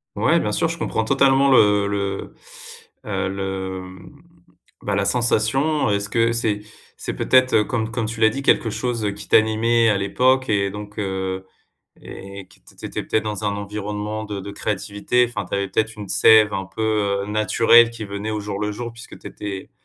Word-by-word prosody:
Ouais, - - +3
bien 105 0 -2
sûr, 165 -2 +1
je 170 - -4
comprends 110 -7 -1
totalement 135 +2 +3
le 105 -4 +4
le, 100 -1 -3 0.7
heu, - - -2
le, 95 -1 -4
mmh, 95 - -13 0.6
bah, - - -2
la 100 - +1
sensation. 120 +6 +1
Est-ce 100 0 0
que 115 +2 +1
c'est 110 -3 -1 0.3
c'est - - -5
peut-être, 130 -4 +3
comme 110 -1 -3
comme 115 -2 -2
tu 115 0 -5
l'as 110 - +6
dit, 140 - -5
quelque 115 -4 +2
chose 115 -1 -2
qui 105 0 -10
t'animait 115 +1 +3
à 100 - +2
l'époque 130 +7 +2
et 100 -2 +1
donc 105 0 -9
heu, 95 -1 -3 0.6
et 100 -1 -10
que - - -22 0.2
tu - - -13
étais - - -4
peut-être 110 - 0
dans 105 -1 -4
un 100 0 -1
environnement 105 +1 -4
de 105 -2 -5
de 100 +1 -7
créativité. 105 +4 -1
Enfin, 105 -5 -5
tu - - -5
avais 100 0 0
peut-être 110 +3 -1
une 105 -2 -8
sève 110 -2 +5
un 95 -1 -3
peu, 105 -1 -1
heu, - - -6
naturelle 115 +2 +4
qui 115 -2 -7
venait 100 +2 -5
au 105 -1 -2
jour 105 0 -5
le 105 0 -1
jour 115 +2 -6
puisque 120 0 -12
tu - - -9
étais 100 -2 -7
105 Hz, 190 wpm, -21 LUFS, 100-115 Hz, 0.7 s, l'as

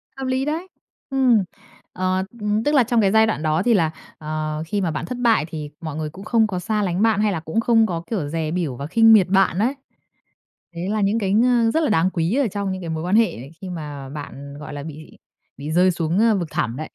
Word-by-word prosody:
Hợp 270 - -5
lý 260 +1 0
đấy! 320 +5 -3 0.4
Ừm, 255 -6 +3 0.5
ờ, 185 +1 0 0.2
ừm, 210 +1 0
tức 295 - +1
là 265 - +6
trong 235 0 +2
cái 195 -2 +3
giai 220 0 +5
đoạn 190 -8 -2
đó 155 0 +1
thì 240 -1 +3
là, 165 -6 +2 0.3
ờ, 155 0 -3
khi 200 +2 -1
mà 175 - 0
bạn 155 - -4
thất 250 - -5
bại 230 -9 +3
thì 155 -3 -6
mọi 155 -3 -5
người 155 -1 -3
cũng 190 +6 -11
không 225 -1 +3
có 185 -4 -3
xa 210 +3 -1
lánh 180 0 -1
bạn, 220 -2 +3
hay 210 -1 +2
là 170 - -2
cũng 160 +7 -2
không 225 -1 +4
có 170 -5 -3
kiểu 190 -10 -2
dè 155 0 -2
bỉu 165 -7 -2
và 140 +4 -6
khinh 225 +5 +6
miệt 200 -5 +6
bạn 190 -1 +2
ấy. 245 +6 +2 1.0
Đấy 175 +3 -4
là 215 0 0
những 205 +3 +1
cái 195 -3 -1
ng 235 +1 +3
rất 320 - +2
là 300 - +1
đáng 185 -3 +3
quý 170 +3 -1
ở 275 -2 +2
trong 200 -1 -3
những 185 0 -5
cái 170 - -6
mối 160 0 -3
quan 180 +3 +1
hệ 230 +1 +6
ấy 130 +5 -10
khi 190 - -6
mà 145 -5 -7
bạn, 140 -1 -8
gọi 150 - -8
là, 145 - -6
bị 155 0 -10 0.4
bị 145 +3 -5
rơi 180 +3 +4
xuống, 170 +1 -1
ơ, 225 -1 +4
vực 175 -4 -2
thẳm 115 +1 -1
đấy. 155 +1 -6
185 Hz, 260 wpm, -22 LUFS, 155-225 Hz, 1.0 s, là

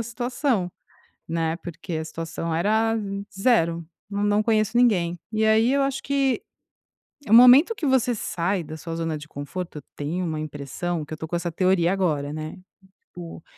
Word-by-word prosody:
a - - 0
situação, 240 -3 -1 0.6
né, 165 0 -1
porque 170 0 -7
a 160 0 -2
situação 165 +1 -4
era 220 +6 +2 0.4
0. 170 -7 +2 0.3
Nã 200 0 -2
não 205 +1 +3
conheço 215 0 +1
ninguém. 180 -8 +3
E 220 0 +1
aí, 220 +3 +4
eu 280 - +2
acho 275 0 -1
que, 275 -2 0 0.9
eh, - - -4
o - - +6
momento 250 - +8
que 325 - -4
você 260 -2 +2
sai 180 -2 -1
da 155 0 -8
sua 165 +2 -6
zona 165 -1 -2
de 150 +1 -11
conforto, 155 +4 -6
eu 145 - -8
tenho 165 +5 -3
uma 160 -2 -3
impressão 155 +3 -4
que 155 - -8
eu - - -5
tô 160 - -6
com 175 - -3
essa 175 0 -2
teoria 185 0 +2
agora, 150 -7 -1
né, 155 +3 -6 0.4
tipo, 170 -2 -10
180 Hz, 180 wpm, -24 LUFS, 160-225 Hz, 0.9 s, momento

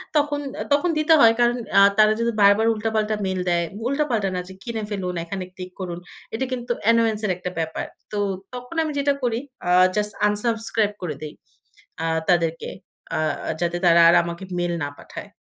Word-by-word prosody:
তখন, 290 -1 +1 0.3
তখন, 290 +5 +2
দিতে 310 +1 +4
হয়। 225 -1 +7
কারণ 240 0 +3 0.2
আ - - +8 0.2
তারা 215 0 +6
যদি 230 0 +1
বারবার 205 +2 +5
উল্টা 220 0 -2
পাল্টা 215 0 +1
মেইল 190 -1 -2
দেয়, 170 -1 +2 0.2
উল্টাপাল্টা 260 -7 0
না, - - -1
যে, - - -9
কিনে 225 -2 -4
ফেলুন, 185 -3 -3
এখানে 185 +3 -5
ক্লিক 185 -1 -8
করুন। 175 -2 -5 0.3
এটা 230 +4 -1
কিন্তু 245 -1 -3
অ্যানোয়েন্স 230 -1 +3
এর 200 - +1
একটা 180 0 -5
ব্যাপার। 160 -1 -3 0.3
তো, 210 - -3 0.4
তখন 250 +5 -8
আমি 310 - -3
যেটা 280 0 +2
করি, 235 -2 +1 0.3
আ - - +1 0.3
জাস্ট 210 0 0 0.2
আনসাবস্ক্রাইব 220 0 0
করে 165 -5 -3
দেই, 155 -1 -7 0.7
আ - - -1 0.3
তাদেরকে। 165 -2 0 0.5
আ - - 0 0.4
যাতে 175 0 0
তারা 170 -1 +6
আর - - +5
আমাকে 170 +2 -6 0.2
মেইল 175 0 -1
না - - -1
পাঠায়। - - -10
210 Hz, 185 wpm, -23 LUFS, 180-235 Hz, 0.7 s, আ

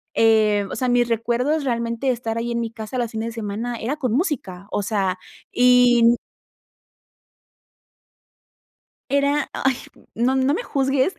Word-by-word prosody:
eh, 215 -2 +3
o - - -5
sea, 255 +2 -1
mis 245 -1 +3
recuerdos 240 +6 0
realmente, 235 0 -1
estar 230 -2 -3
ahí 235 +1 -2
en 235 - -1
mi 230 -1 -3
casa 225 +2 -6
los 235 -2 -2
fines 225 +1 -3
de - - -7
semana, 230 +2 -4
era 245 +7 -2
con 255 -6 -1
música 250 - -2
o 205 - 0
sea, 195 -3 -1 0.3
y 245 -1 +5
mm 235 +1 +5 2.9
Era, 280 +1 +1
ay, 265 -1 0 0.4
no 245 +4 +1
no 265 +2 +2
me 435 - -2
juzgues 270 - 0
240 Hz, 150 wpm, -22 LUFS, 225-265 Hz, 2.9 s, y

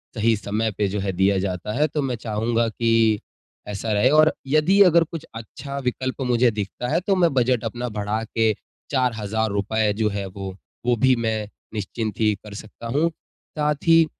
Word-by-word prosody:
सही 115 0 +3
समय 110 +2 -1
पे 105 - +2
जो 100 +2 -2
है 95 0 -1
दिया 95 +2 +2
जाता 95 +2 -3
है। 150 - +4
तो 150 +1 -2
मैं 130 -3 -1
चाहूँगा 115 +1 0
कि 115 -1 +2 0.5
ऐसा 105 +2 -3
रहे, 105 +5 +4
और 155 +2 +5
यदि 155 +8 +4
अगर 170 -2 +5
कुछ 165 -1 -8
अच्छा 140 +5 -7
विकल्प 130 +2 -2
मुझे 125 -1 +3
दिखता 105 +3 -4
है 165 - +3
तो 195 - +4
मैं 175 -5 +3
बजट 125 -2 +2
अपना 120 +2 -3
बढ़ा 105 +1 -2
के 110 0 +1 0.4
₹4000 110 -4 0
जो 110 -1 +2
है 100 -1 -3
वो, 95 0 -7 0.3
वो 120 0 +3
भी 130 +3 +4
मैं 110 -2 -1 0.3
निश्चिंत 110 0 -4
ही 110 -1 +3
कर 105 - -10
सकता 110 +3 -9
हूँ। 150 +7 +2 0.5
साथ 150 0 +2
ही 165 0 +7
115 Hz, 180 wpm, -23 LUFS, 105-130 Hz, 0.5 s, ही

